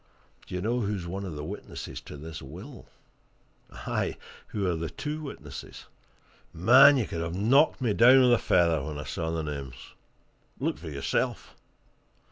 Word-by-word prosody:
"Do - - -6
you 90 - -2
know 120 +3 0
who's 100 -5 -2
one 95 +3 -5
of 85 -5 -6
the 75 - -5
witnesses 100 +7 -7
to - - -10
this 80 +2 -8
will? 95 - -11 0.8
Aye, - - -3 0.3
who 100 -2 -3
are 90 -2 +1
the 80 0 -4
two 155 +1 -5
witnesses? 75 - -9 0.7
Man! 130 - +7
you 120 - +1
could 85 - -5
have 85 +1 -3
knocked 130 - +3
me 115 -5 +1
down 125 +5 +7
with 125 -1 +5
a 120 - +4
feather 85 -5 +2
when 75 0 -5
I 75 - -5
saw 80 - -3
the 80 -1 -2
names! 70 -4 -5 0.8
Look - - -2
for 80 0 -7
yourself!" 70 -2 -2
90 Hz, 170 wpm, -28 LUFS, 80-120 Hz, 0.8 s, Man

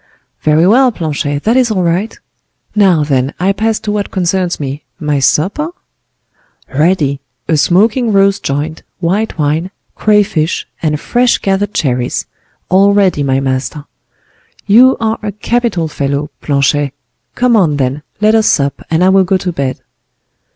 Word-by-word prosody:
"Very 155 +2 +3
well, 250 +6 +4
Planchet, 145 -6 -3
that 225 +3 +2
is 255 -2 +3
all 190 -4 0
right. 175 +6 -1 0.6
Now, 190 -7 +4
then, 135 -1 -1
I 190 +3 +2
pass 220 +1 -1
to 210 - -3
what 205 -1 -2
concerns 180 -1 -1
me—my 145 +1 -4
supper?" 195 - +1 1.0
"Ready. 150 -2 +1 0.3
A 160 - +2
smoking 215 - +2
roast 200 0 +3
joint, 150 +3 -3 0.2
white 190 +6 -1
wine, 155 +4 0 0.2
crayfish, 200 -6 +1 0.2
and 150 -2 -1
fresh 245 +6 +1
gathered 200 +1 -1
cherries. 125 -4 -1 0.4
All 195 +2 +4
ready, 195 -7 +2
my 135 -1 +1
master." 135 +2 -3 0.8
"You 245 +6 +5
are 225 0 -1
a 210 -1 -3
capital 210 -4 -1
fellow, 140 0 -3
Planchet; 140 0 0 0.4
come 245 -1 +2
on, 165 -9 +2
then, 135 +2 -1 0.2
let 215 +1 +4
us 220 -1 +3
sup, 140 -1 +1
and 165 +2 +1
I 185 - +5
will 190 0 +4
go 190 +1 +1
to 180 -1 -3
bed." 140 -5 -3
180 Hz, 145 wpm, -13 LUFS, 145-210 Hz, 1.0 s, You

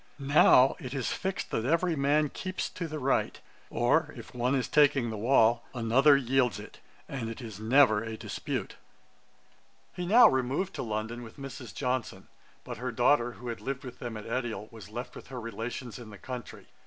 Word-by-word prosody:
Now 135 -2 +5
it 130 +2 -6
is 130 -3 -1
fixed 190 +1 -3
that 110 - -1
every 165 +5 +1
man 145 +1 +2
keeps 185 +4 -4
to 170 - -5
the 155 0 -5
right; 135 -1 0 0.3
or, - - +1
if - - -11
one 125 +2 0
is 130 - 0
taking 140 -6 +3
the - - -4
wall, 115 +1 +3
another 130 +5 +5
yields 125 -5 +1
it; - - -12 0.3
and 125 -5 -4
it 115 - -7
is 110 -5 -8
never 110 -1 +4
a 110 -1 -6
dispute.' - - -5 1.2
He 175 -1 -4
now 235 +6 +8
removed 130 +9 0
to - - -2
London 110 +1 -4
with 115 +2 -11
Mrs. 135 -2 -8
Johnson; 130 -3 -3 0.3
but - - -7
her 125 +2 -3
daughter, 120 0 +2
who 120 +1 -8
had 115 - -5
lived 135 0 -4
with 125 -2 -9
them 120 -3 -5
at 105 - -9
Edial, 115 -3 -3
was 110 -3 -11
left 120 +3 -7
with - - -11
her 130 -1 -7
relations 115 +2 -6
in 115 -3 -10
the 105 - -11
country. 125 +2 -8
125 Hz, 190 wpm, -29 LUFS, 115-140 Hz, 1.2 s, now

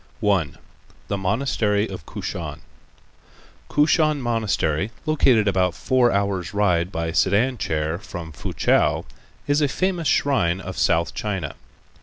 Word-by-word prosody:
1. 95 -8 +1 0.5
The 100 - 0
Monastery 105 0 0
of 90 -5 -9
Kushan - - -5 1.1
Kushan 155 0 +3
Monastery, 110 - 0 0.2
located 130 -8 +3
about 90 -2 +1
four 125 -2 +2
hours' 100 -2 -1
ride 90 -3 +2
by 80 -2 -2
sedan 100 +8 +2
chair 80 +2 -1
from 85 -5 -8
Foochow, 70 - +1 0.4
is 145 +1 +2
a 145 - +3
famous 175 +2 -1
shrine 95 -11 +2
of 95 -1 -7
South 85 0 +1
China. 95 -8 -3
100 Hz, 120 wpm, -23 LUFS, 85-125 Hz, 1.1 s, Kushan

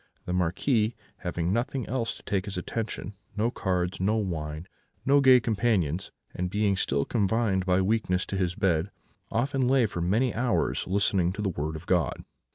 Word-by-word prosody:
The 90 - -2
Marquis, 105 - +1 0.2
having 90 -1 -2
nothing 125 +2 -1
else 120 -2 -2
to - - -16
take 95 -1 -1
his 100 -3 -5
attention 105 +1 -4 0.2
no 115 +3 +1
cards, 90 -3 -1
no 105 +4 +2
wine, 80 -5 -3 0.4
no 140 +1 +5
gay 130 -2 +7
companions 100 -7 0 0.2
and 90 0 -2
being 105 0 +1
still 70 -6 0
confined 100 -3 +1
by 90 +1 +3
weakness 95 -2 +1
to 100 - -5
his 90 -2 0
bed, 90 -1 +1 0.4
often 130 +2 0
lay 130 -2 +4
for 90 -5 -3
many 110 +8 +2
hours 120 +1 0
listening 95 -2 +2
to 105 - -4
the 100 - +1
Word 80 -2 -3
of 80 +3 -8
God. 90 -3 0
100 Hz, 170 wpm, -27 LUFS, 90-115 Hz, 0.4 s, gay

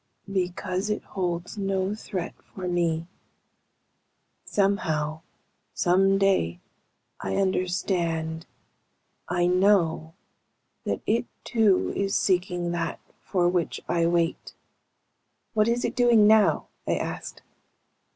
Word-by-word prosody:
"Because 185 +1 -1
it 210 - -1
holds 180 +1 -3
no 195 0 0
threat 195 -4 -5
for 185 -2 -7
me. 170 -2 0 1.4
Somehow, 160 -6 0 0.5
someday, 190 - +3 0.6
I 95 0 -3
understand 175 -3 -1 0.8
I 175 0 +1
know 180 -3 +2 0.7
that - - -1
it 230 +3 +1 0.2
too 215 -5 +2
is 195 0 0
seeking 180 -2 +1
that 170 -1 -2 0.2
for 180 -3 0
which 175 -2 0
I 170 -1 +2
wait." 170 0 0 1.0
"What 215 -1 +3
is 235 +1 +1
it - - -2
doing 240 -4 +5
now?" 215 0 +4 0.2
I - - +2
asked. - - -5
180 Hz, 100 wpm, -26 LUFS, 170-200 Hz, 1.4 s, doing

